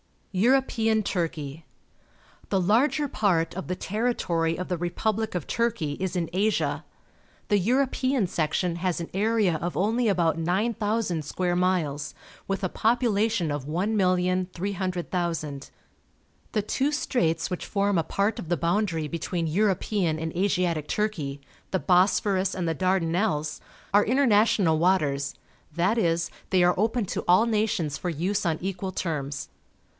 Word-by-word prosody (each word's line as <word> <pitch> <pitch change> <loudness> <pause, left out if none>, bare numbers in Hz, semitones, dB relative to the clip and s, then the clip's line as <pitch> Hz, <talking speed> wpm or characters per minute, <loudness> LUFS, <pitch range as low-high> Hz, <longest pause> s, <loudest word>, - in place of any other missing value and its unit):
EUROPEAN 225 0 +2
TURKEY 165 -7 -2
0*t<^ - - -16
r - - -23 0.9
The 195 - +2
larger 255 +10 +2
part 180 -8 +1
of 190 +1 -6
the 185 - -2
territory 180 -7 -1
of 180 - -4
the 180 - -1
republic 215 +5 -1
of 175 - -2
Turkey 230 -11 -1
is 190 0 -2
in 170 -2 0
Asia. 205 +4 0 0.7
The 205 -2 +4
European 255 +2 +1
section 170 +1 -1
has 180 0 -1
an 170 - -5
area 205 -3 +2
of 170 +3 -4
only 225 +5 +1
about 170 -5 +2
9,000 205 0 0
square 175 +3 -1
miles, 165 -6 0 0.3
with 195 0 -2
a 185 - +1
population 220 - +1
of 145 -2 -3
1,300,000. 180 -4 -1 0.8
The 215 - +2
two 270 +7 0
straits 165 - 0
which 180 - -3
form 200 -1 +1
a 165 - +2
part 200 +6 -1
of - - -6
the 175 - +1
boundary 170 -3 0
between 170 +1 -2
European 190 -1 +1
and 160 0 -4
Asiatic 175 -5 0
Turkey 155 -10 -2
— - - -32
the 190 - +1
Bosphorus 190 +1 +2
and 180 -2 -2
the 165 - +1
Dardanelles 170 -3 0 0.2
— - - -26
are 205 +1 +6
international 215 - +3
waters, 150 -6 +1 0.4
that 185 +7 +2
is, 170 -3 +1 0.2
they 185 -2 +4
are 175 0 +5
open 225 +2 +1
to - - -3
all 180 +6 +5
nations 210 -9 0
for 180 - -3
use 185 +6 -1
on 165 -2 +1
equal 190 0 -3
terms. 145 -6 -3
185 Hz, 145 wpm, -26 LUFS, 165-210 Hz, 0.9 s, are